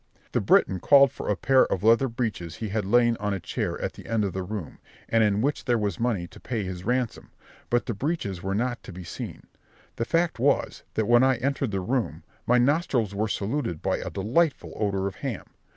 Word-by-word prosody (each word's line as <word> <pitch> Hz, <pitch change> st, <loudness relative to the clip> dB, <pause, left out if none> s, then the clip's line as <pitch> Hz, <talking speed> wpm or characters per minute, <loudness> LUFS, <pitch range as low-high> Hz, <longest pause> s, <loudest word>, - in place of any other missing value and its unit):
The -, -, +1 dB
Breton 95 Hz, -, +3 dB
called 140 Hz, -, +6 dB
for -, -, -6 dB
a 105 Hz, -, +2 dB
pair 130 Hz, +5 st, +4 dB
of 95 Hz, -, -2 dB
leather 115 Hz, +4 st, +5 dB
breeches 110 Hz, -9 st, -3 dB
he 110 Hz, -, -5 dB
had 105 Hz, 0 st, -1 dB
laid 120 Hz, +2 st, +3 dB
on 105 Hz, -1 st, -1 dB
a -, -, -4 dB
chair 85 Hz, -, -3 dB
at -, -, -3 dB
the -, -, -12 dB
end 110 Hz, -2 st, +1 dB
of 95 Hz, -, -3 dB
the 95 Hz, -, -2 dB
room, 95 Hz, -3 st, -6 dB, 0.3 s
and 115 Hz, -1 st, +3 dB
in 105 Hz, 0 st, +2 dB
which 145 Hz, +4 st, -1 dB
there 120 Hz, -2 st, +2 dB
was 105 Hz, -4 st, -2 dB
money 115 Hz, -7 st, 0 dB
to -, -, -14 dB
pay 115 Hz, -5 st, -3 dB
his 90 Hz, -1 st, -5 dB
ransom, 125 Hz, +2 st, -1 dB, 0.4 s
but 120 Hz, 0 st, +1 dB
the 120 Hz, -, -2 dB
breeches 100 Hz, -, -2 dB
were 95 Hz, +1 st, -2 dB
not 120 Hz, +3 st, -1 dB
to -, -, -10 dB
be 90 Hz, 0 st, -8 dB
seen. 85 Hz, -, -7 dB, 0.5 s
The 115 Hz, -, -1 dB
fact 165 Hz, -1 st, +1 dB
was, 140 Hz, +3 st, +1 dB
that 110 Hz, -, +1 dB
when 120 Hz, 0 st, +6 dB
I 130 Hz, 0 st, +4 dB
entered 135 Hz, 0 st, -1 dB
the 95 Hz, -2 st, -2 dB
room, 120 Hz, +5 st, -2 dB, 0.2 s
my 125 Hz, -, +5 dB
nostrils 125 Hz, -, +2 dB
were 105 Hz, +2 st, 0 dB
saluted 105 Hz, -, -2 dB
by -, -, +1 dB
a -, -, -5 dB
delightful 135 Hz, -, 0 dB
odour 100 Hz, -2 st, -1 dB
of 100 Hz, -, -4 dB
ham. 130 Hz, -9 st, -4 dB
115 Hz, 220 wpm, -26 LUFS, 100-125 Hz, 0.5 s, called